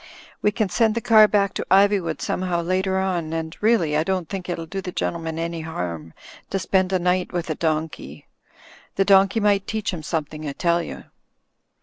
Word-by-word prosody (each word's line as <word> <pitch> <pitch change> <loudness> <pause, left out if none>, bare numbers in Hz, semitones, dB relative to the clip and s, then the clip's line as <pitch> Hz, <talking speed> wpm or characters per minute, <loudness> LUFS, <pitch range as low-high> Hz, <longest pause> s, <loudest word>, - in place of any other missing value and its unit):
We - - +3
can 210 0 -1
send 220 +3 +2
the - - +1
car 220 -2 +6
back 200 -2 +1
to - - -4
Iv3nvood 195 -6 +3
somehow 175 +3 -1
later 190 +2 0
on, 175 -4 -1
and 160 0 -4
really, 210 -9 +2
I 155 - +2
don't 185 -1 -2
think 190 -2 -6
it'll 170 -1 -3
do 195 +4 -5
the 185 -1 -6
gentleman 165 -2 -3
any 165 0 -3
harm 85 - -5 0.3
to 195 - -1
spend 190 0 +1
a 190 - +3
night 180 +1 0
with 170 -2 -3
a - - -1
donkey. 155 - -3 0.7
The 195 - +2
donkey 195 +2 +5
might 205 -2 +2
teach 215 -3 -2
him 170 - -5
something, 155 -1 -4
I - - -5
tell 170 +2 +1
you." 165 - -8
180 Hz, 195 wpm, -23 LUFS, 160-195 Hz, 0.7 s, car